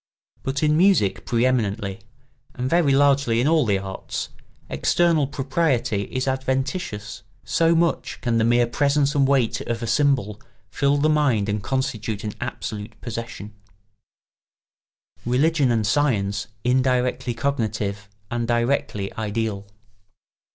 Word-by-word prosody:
But 135 +2 -2
in 150 0 +3
music 175 - +3
pre 120 +1 +2
eminently, 105 -6 -1 0.6
and 125 +1 -2
very 165 -1 +3
largely 140 -4 +3
in 125 - +2
all 155 -5 +3
the 100 -2 +2
arts, 95 0 -5 0.4
external 165 -5 +2
propriety 135 -7 0
is 130 +5 -3
adventitious; 130 - -2 0.2
so 165 0 +2
much 170 0 0
can 115 -2 0
the - - +2
mere 120 +1 +4
presence 140 +3 +1
and 140 -3 +3
weight 135 -5 +1
of 120 0 -3
a - - -1
symbol 115 -4 +1 0.3
fill 140 0 +2
the 145 +2 +2
mind 145 -9 +2
and 105 0 -1
constitute 110 -1 -2
an 105 -1 -4
absolute 105 -1 -6
possession. 115 -3 -7 1.7
[Sidenote: 120 - -5
Religion 145 0 +3
and 110 -2 +1
science 105 -5 0 0.2
indirectly 125 -1 +1
cognitive 110 -5 -2 0.2
and 120 -1 -1
directly 120 -4 0
ideal. 110 -2 -3
125 Hz, 130 wpm, -23 LUFS, 110-140 Hz, 1.7 s, mere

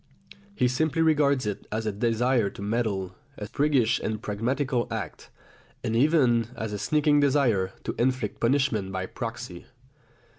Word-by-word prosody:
He 125 - +2
simply 155 +5 +1
regards 145 -5 +3
it 105 -1 -4
as 110 +1 -2
a 110 - 0
desire 115 +1 +1
to 100 - -11
meddle, 100 -4 -1 0.2
a 105 - -5
priggish 130 -3 +2
and 110 -1 -3
pragmatical 120 +5 -1
act, 100 -8 -6 0.5
and 115 - -1
even 125 -4 +3
as 110 -2 -4
a 105 - -3
sneaking 145 +6 +3
desire 125 -10 +2
to - - -3
inflict 125 -3 0
punishment 120 -6 +1
by 95 0 -3
proxy. 115 -6 -7
115 Hz, 145 wpm, -26 LUFS, 105-140 Hz, 0.5 s, regards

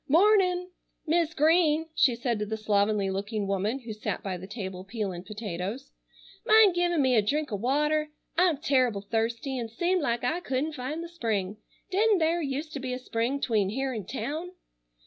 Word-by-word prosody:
"Mornin'! 365 +2 +4 0.3
Mis' 325 0 +1
Green," 315 0 +4
she 265 -6 +3
said 235 -2 -1
to 210 - -1
the 220 +1 -3
slovenly 205 -2 +1
looking 205 +2 -2
woman 200 +7 -1
who 230 -2 -6
sat 215 - -4
by 190 -2 -3
the 180 +1 -8
table 190 -3 -6
peeling 195 -4 -4
potatoes. 210 +4 -5 0.5
"Mind 435 -3 +6
givin' 350 -1 +1
me 260 -1 +3
a 220 - +5
drink 290 +6 -1
o' - - 0
water? 300 +7 +1 0.3
I'm 345 -3 +3
terrible 255 -7 +1
thirsty, 230 +5 -2
and 230 -1 -4
seemed 345 +10 0
like 235 -4 -1
I 310 +8 0
couldn't 295 -1 -2
find 295 +5 -4
the - - -6
spring. 215 - -2 0.3
Didn't 420 +2 +4
thare 335 +1 +1
used 295 +2 -3
to 285 - -4
be 260 -1 -3
a - - -2
spring 250 +2 -2
'tween 215 -7 +1
here'n 255 -1 -2
town?" 315 +6 -4
255 Hz, 180 wpm, -28 LUFS, 215-315 Hz, 0.5 s, Mind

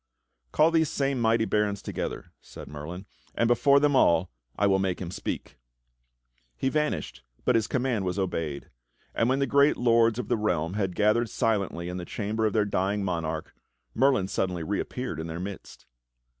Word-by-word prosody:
"Call 155 +2 +4
these 160 -2 +2
same 135 -2 -1
mighty 115 0 +3
barons 105 -2 0
together," - - -5
said - - -11
Merlin, 80 +6 -7 0.3
"and 115 - +2
before 140 +4 +5
them 145 -1 +2
all 85 -7 +3 0.2
I 100 - +1
will 95 -1 +3
make 95 -2 -1
him 90 -2 -5
speak." 75 - -5 1.0
He 135 - 0
vanished, 150 +1 -2 0.2
but 125 - +4
his 115 -2 +2
command 125 -5 0
was 90 +1 -2
obeyed; 80 -7 -3 0.4
and 115 - +1
when 130 - +2
the 140 - +1
great 140 +3 +4
lords 115 -2 +3
of 125 - -3
the - - +1
realm 90 -6 0
had 95 -3 -2
gathered 110 +3 +2
silently 100 -6 -1
in 90 +1 -4
the 90 - -5
chamber 110 +2 -1
of 105 - -2
their 105 -2 +2
dying 100 +1 0
monarch. 80 -4 -3 0.4
Merlin 130 -6 +3
suddenly 90 -3 -2
reappeared 100 - -3
in 80 - -4
their 80 +1 -5
midst. 100 +2 -8
105 Hz, 175 wpm, -27 LUFS, 90-120 Hz, 1.0 s, before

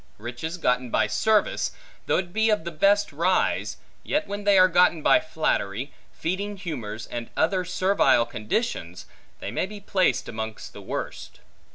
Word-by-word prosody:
Riches 120 +10 -5
gotten 125 -6 0
by - - +2
service, 215 - +1 0.3
though - - +3
it 175 -2 -3
be 220 +1 +2
of 210 -6 +2
the 170 - -5
best 200 +5 +3
rise, 180 +5 +1 0.2
yet 305 +1 -1
when 205 0 -6
they 200 -1 +5
are 185 0 +8
gotten 175 -3 +3
by - - +6
flattery, 140 -6 -2 0.2
feeding 200 +4 -3
humors, 120 - -5
and 120 -1 -6
other 185 +3 +2
servile 180 -9 +3
conditions, 105 - -3 0.4
they - - -4
may - - -1
be 210 +1 -9
placed 185 -10 +1
amongst 110 -1 -6
the - - -10
worst. - - -6
170 Hz, 160 wpm, -25 LUFS, 120-200 Hz, 0.4 s, are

